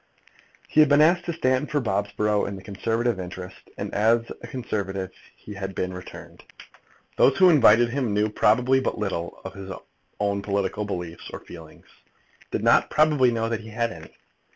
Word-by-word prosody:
He - - +1
had 150 -2 +7
been 145 0 +5
asked 170 +3 +4
to 170 - -2
stand 130 -3 0
for 150 - 0
Bobsborough 105 -2 0
in 100 - -5
the 95 - -11
Conservative 115 +2 -1
interest, 90 +1 -9
and - - -5
as 115 +3 +3 0.2
a - - -8
Conservative 100 -6 -4 0.2
he 105 - -11
had 95 -1 -6
been 90 0 -2
returned. 90 0 -11 0.7
Those 140 - +4
who 185 -2 +7
invited 120 -5 +5
him 130 -4 -1
knew 105 +1 +2
probably 125 +5 +3
but 130 - -2
little 95 -5 -4
of - - -6
his 95 -1 -9 0.5
own 100 -1 0
political 100 +1 -2
beliefs 90 -4 -6
or - - -8
feelings, 80 -2 -13 0.6
did - - -3
not, - - +4
probably, 150 -5 +3
know 115 -1 -1
whether 115 0 -1
he 110 +1 -11
had 115 +1 -1
any. 80 -3 -11
105 Hz, 175 wpm, -24 LUFS, 95-125 Hz, 0.7 s, had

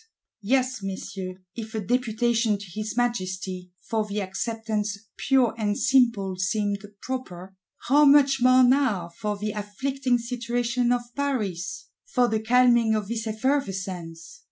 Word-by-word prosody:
—Yes, 255 +2 +1
Messieurs, 190 -1 -5 0.2
if 225 -1 -7
a - - 0
Deputation 230 0 +1
to 205 - -9
his 215 +3 -4
Majesty, 185 -6 -2 0.2
for 220 -1 0
the 210 0 -4
"Acceptance 210 +1 -2 0.2
pure 260 -4 +2
and 205 -1 0
simple," 235 -8 +2
seemed 205 +1 -1 0.2
proper,—how 245 +4 -1
much 275 -2 +5
more 255 +1 +6
now, 245 -9 +2
for 210 +4 -4
"the 210 +1 -3
afflicting 245 +5 -1
situation 240 0 -1
of 240 -1 -2
Paris;" 210 -10 -2 0.2
for 245 -1 +1
the 220 -2 0
calming 235 -1 +4
of 210 -2 -3
this 225 -1 -3
effervescence! 195 - -3
220 Hz, 130 wpm, -25 LUFS, 195-250 Hz, 0.2 s, more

